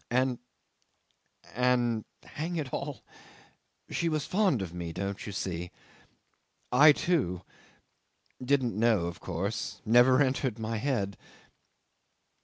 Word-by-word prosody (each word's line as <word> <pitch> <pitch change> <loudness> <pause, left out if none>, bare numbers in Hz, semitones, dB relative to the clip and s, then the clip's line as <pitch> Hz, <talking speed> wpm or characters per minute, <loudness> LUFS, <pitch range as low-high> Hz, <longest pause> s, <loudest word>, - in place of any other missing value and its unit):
And 125 0 +1 1.1
and 120 -2 +1 0.2
hang 165 +4 -5
it 145 -6 -4
all - - -4 0.9
she 170 - 0
was 155 -2 -1
fond 185 - +2
of 85 -3 -7
me, 85 -1 -5
don't 100 +3 -4
you - - -4
see.... 90 -2 -4 1.0
I 145 +5 +8
too... 135 - 0 1.0
didn't 130 -2 +1
know, 110 -5 +3
of 85 +1 -5
course... 95 +5 -3
never 120 +4 +6
entered 130 -4 +1
my 115 0 -3
head 105 -6 -1
120 Hz, 110 wpm, -29 LUFS, 100-135 Hz, 1.1 s, I